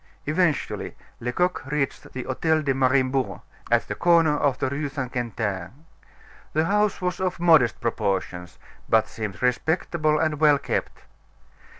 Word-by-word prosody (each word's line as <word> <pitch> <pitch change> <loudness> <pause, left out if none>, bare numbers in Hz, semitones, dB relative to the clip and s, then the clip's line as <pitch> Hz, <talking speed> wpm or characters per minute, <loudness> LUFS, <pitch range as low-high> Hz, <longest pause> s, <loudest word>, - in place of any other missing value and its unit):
Eventually, 155 0 0 0.2
Lecoq 180 +10 -1
reached 145 -1 -2
the 130 - -4
Hotel 155 +5 0
de 135 -2 +1
Mariembourg, 130 0 +1 0.3
at - - +2
the - - -3
corner 165 -3 +4
of 140 -3 +1
the - - -1
Rue 140 +2 -3
St. 135 -3 -4
Quentin. 115 - -4 0.7
The 155 +1 +2
house 205 0 +1
was 180 -1 -1
of 185 -2 -1
modest 160 -10 +4
proportions; 95 -6 -2 0.3
but 110 -1 +4
seemed 105 -4 -6
respectable 155 +4 +1
and 155 -2 0
well 150 -2 +5
kept. - - -4
140 Hz, 135 wpm, -24 LUFS, 125-160 Hz, 0.7 s, well